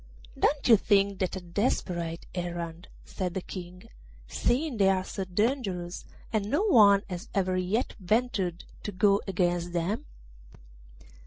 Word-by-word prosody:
'Don't 290 Hz, -1 st, +1 dB
you 235 Hz, -, +9 dB
think 200 Hz, -1 st, +2 dB
that 185 Hz, 0 st, -1 dB
a -, -, -3 dB
desperate 175 Hz, -3 st, -2 dB
errand?' 175 Hz, -1 st, -5 dB, 0.2 s
said 180 Hz, -3 st, -4 dB
the 190 Hz, -, -1 dB
King, 180 Hz, 0 st, -9 dB, 0.4 s
'seeing 250 Hz, -, 0 dB
they 195 Hz, -2 st, +4 dB
are 190 Hz, -1 st, +2 dB
so 195 Hz, -, -4 dB
dangerous, 185 Hz, -3 st, -1 dB, 0.3 s
and 210 Hz, -2 st, 0 dB
no 300 Hz, -, +2 dB
one 205 Hz, -, +6 dB
has 185 Hz, +3 st, -6 dB
ever 185 Hz, -2 st, +1 dB
yet 185 Hz, +7 st, 0 dB
ventured 195 Hz, -4 st, 0 dB, 0.2 s
to 205 Hz, -, -4 dB
go 200 Hz, +1 st, +3 dB
against 175 Hz, -2 st, 0 dB
them? 175 Hz, +6 st, -1 dB
190 Hz, 140 wpm, -28 LUFS, 175-210 Hz, 0.4 s, you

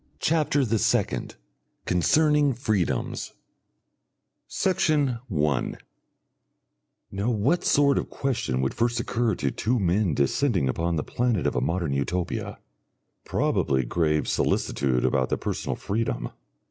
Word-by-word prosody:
CHAPTER 150 Hz, -, +1 dB
THE 115 Hz, -1 st, 0 dB
SECOND -, -, 0 dB, 0.5 s
Concerning 150 Hz, -, +3 dB
Freedoms 105 Hz, -, -1 dB, 1.1 s
Section 150 Hz, -9 st, +1 dB
1 75 Hz, -, 0 dB, 1.3 s
Now 100 Hz, +4 st, -1 dB
what 125 Hz, -, +1 dB
sort 140 Hz, -1 st, +3 dB
of -, -, -5 dB
question 115 Hz, -, -1 dB
would 65 Hz, -, -1 dB
first 120 Hz, 0 st, 0 dB
occur 115 Hz, -2 st, 0 dB
to 70 Hz, -4 st, -1 dB
two 120 Hz, +2 st, 0 dB
men 95 Hz, -3 st, +1 dB
descending 95 Hz, -, +1 dB
upon 85 Hz, +6 st, -1 dB
the 75 Hz, -, -1 dB
planet 120 Hz, -6 st, -1 dB
of -, -, 0 dB
a -, -, +1 dB
Modern 85 Hz, +1 st, -1 dB
Utopia? 85 Hz, +6 st, -2 dB, 0.7 s
Probably 65 Hz, -2 st, +1 dB
grave 75 Hz, +2 st, 0 dB
solicitude 65 Hz, -3 st, 0 dB
about 65 Hz, -2 st, +1 dB
their -, -, 0 dB
personal -, -, -3 dB
freedom. 105 Hz, -, -2 dB
100 Hz, 120 wpm, -25 LUFS, 75-125 Hz, 1.3 s, Concerning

